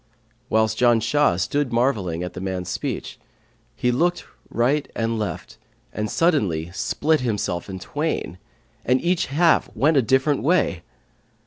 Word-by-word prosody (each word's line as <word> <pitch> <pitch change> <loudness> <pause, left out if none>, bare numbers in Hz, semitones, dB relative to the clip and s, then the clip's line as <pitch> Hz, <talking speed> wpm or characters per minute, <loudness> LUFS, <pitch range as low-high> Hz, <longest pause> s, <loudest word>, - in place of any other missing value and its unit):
Whilst 110 0 +2
Janshah 120 -3 +3
stood 135 +9 0
marvelling 105 -9 0
at 90 - -5
the 95 - -7
man's 95 -2 -3
speech - - -4 0.6
he 125 - +1
looked 175 +8 0 0.2
right 135 +6 +1
and 115 0 -1
left 105 - -5 0.3
and 105 +1 -3
suddenly 100 - +1
split 155 +10 +1
himself 105 -7 -2
in 95 - -5
twain, 145 - -3 0.4
and 125 +2 +2
each 175 +2 0
half 165 +5 +3
went 145 +7 +3
a - - +6
different 135 +4 +2
way. 155 - +1
120 Hz, 135 wpm, -23 LUFS, 95-145 Hz, 0.6 s, a